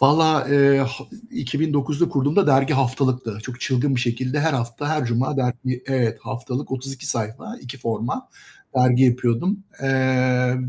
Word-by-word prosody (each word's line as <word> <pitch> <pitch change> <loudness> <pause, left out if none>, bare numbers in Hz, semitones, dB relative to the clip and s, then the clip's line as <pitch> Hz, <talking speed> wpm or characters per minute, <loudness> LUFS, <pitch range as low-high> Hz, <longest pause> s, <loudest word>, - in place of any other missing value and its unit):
Vallahi, 155 +1 +4
eee, 140 -1 +6
ha 135 - +2 0.4
2009'da 150 - 0
kurduğumda 145 +8 +2
dergi 135 +1 +4
haftalıktı. 130 -4 0
Çok 130 +1 -8
çılgın 135 +1 +1
bir 120 - 0
şekilde 125 +4 -1
her 160 0 +2
hafta, 120 +3 -3
her 155 -3 0
cuma 120 +4 0
dergi, 125 0 -2
evet, 130 -4 0
haftalık 130 +2 -5
32 135 0 -5
sayfa, 120 - -4
2 125 +2 -9
forma 115 - -3 0.5
dergi 125 0 +4
yapıyordum, 125 - +1 0.2
eee, 130 -1 +2
130 Hz, 140 wpm, -22 LUFS, 125-145 Hz, 0.5 s, eee